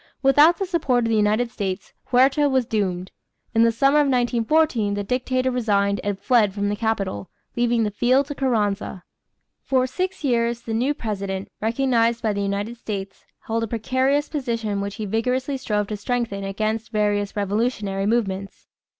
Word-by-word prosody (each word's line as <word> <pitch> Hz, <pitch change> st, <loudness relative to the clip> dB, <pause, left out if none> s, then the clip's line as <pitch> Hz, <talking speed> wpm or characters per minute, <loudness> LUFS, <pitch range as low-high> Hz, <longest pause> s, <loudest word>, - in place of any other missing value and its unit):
Without 295 Hz, +5 st, +6 dB
the 390 Hz, -, -1 dB
support 290 Hz, -9 st, +1 dB
of -, -, 0 dB
the 225 Hz, -, +2 dB
United 215 Hz, +3 st, +2 dB
States, 190 Hz, -4 st, -4 dB
Huerta 270 Hz, +3 st, +3 dB
was 260 Hz, -2 st, +2 dB
doomed. 190 Hz, -5 st, -2 dB, 0.4 s
In 225 Hz, -, +3 dB
the 230 Hz, 0 st, +5 dB
summer 275 Hz, +5 st, +3 dB
of 295 Hz, -, +3 dB
1914, 245 Hz, -2 st, +1 dB
the 205 Hz, -, -2 dB
dictator 255 Hz, +3 st, 0 dB
resigned 200 Hz, -5 st, +1 dB
and 205 Hz, -1 st, -2 dB
fled 210 Hz, -1 st, +2 dB
from 205 Hz, 0 st, -1 dB
the 205 Hz, -, -1 dB
capital, 200 Hz, -, -2 dB, 0.3 s
leaving 240 Hz, -1 st, +2 dB
the 210 Hz, -, -1 dB
field 255 Hz, +6 st, +2 dB
to 290 Hz, -, -5 dB
Carranza. 210 Hz, -8 st, -1 dB, 0.6 s
For 260 Hz, -1 st, +1 dB
six 365 Hz, +7 st, -3 dB
years 235 Hz, -3 st, +1 dB
the 230 Hz, -1 st, -5 dB
new 255 Hz, +6 st, +1 dB
president, 195 Hz, -4 st, -4 dB
recognized 235 Hz, 0 st, +1 dB
by 215 Hz, -2 st, +1 dB
the 200 Hz, -, -2 dB
United 200 Hz, +4 st, -2 dB
States, 200 Hz, -4 st, -6 dB, 0.2 s
held 230 Hz, 0 st, -2 dB
a 225 Hz, -, -1 dB
precarious 260 Hz, +6 st, 0 dB
position 230 Hz, -8 st, -2 dB
which 200 Hz, 0 st, -4 dB
he 215 Hz, -, -4 dB
vigorously 250 Hz, +6 st, -1 dB
strove 210 Hz, -5 st, -1 dB
to 210 Hz, -, -3 dB
strengthen 225 Hz, -2 st, -2 dB
against 215 Hz, +3 st, -2 dB
various 205 Hz, -1 st, 0 dB
revolutionary 205 Hz, -1 st, -1 dB
movements. 195 Hz, -4 st, -2 dB
225 Hz, 165 wpm, -23 LUFS, 205-255 Hz, 0.6 s, Without